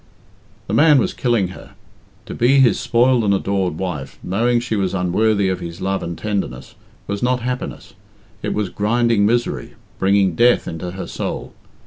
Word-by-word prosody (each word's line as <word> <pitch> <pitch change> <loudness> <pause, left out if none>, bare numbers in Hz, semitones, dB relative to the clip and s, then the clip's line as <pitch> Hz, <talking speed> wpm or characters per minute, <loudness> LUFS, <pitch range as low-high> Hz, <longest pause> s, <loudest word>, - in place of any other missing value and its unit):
The 100 - -5
man 150 +5 +6
was 125 - +1
killing 115 -7 +1
her. - - -12 0.5
To - - -7
be 130 +4 +3
his 130 -3 +4
spoiled 120 0 +3
and 100 -1 +3
adored 95 -4 -1
wife, 75 -8 -5
knowing 120 +6 +1
she 120 -2 -3
was 95 -2 -1
unworthy 100 +3 +1
of 95 -1 -1
his 85 -1 -7
love 95 +1 -1
and 85 0 -5
tenderness, 95 - -4 0.3
was 100 0 -4
not 125 0 +1
happiness 125 +1 -5 0.5
it - - -2
was 105 -3 -1
grinding 115 0 +2
misery, 120 +2 -1 0.2
bringing 95 -1 +3
death 120 +8 +3
into 85 +2 -5
her 95 +2 -6
soul. - - -5
100 Hz, 165 wpm, -20 LUFS, 95-120 Hz, 0.5 s, man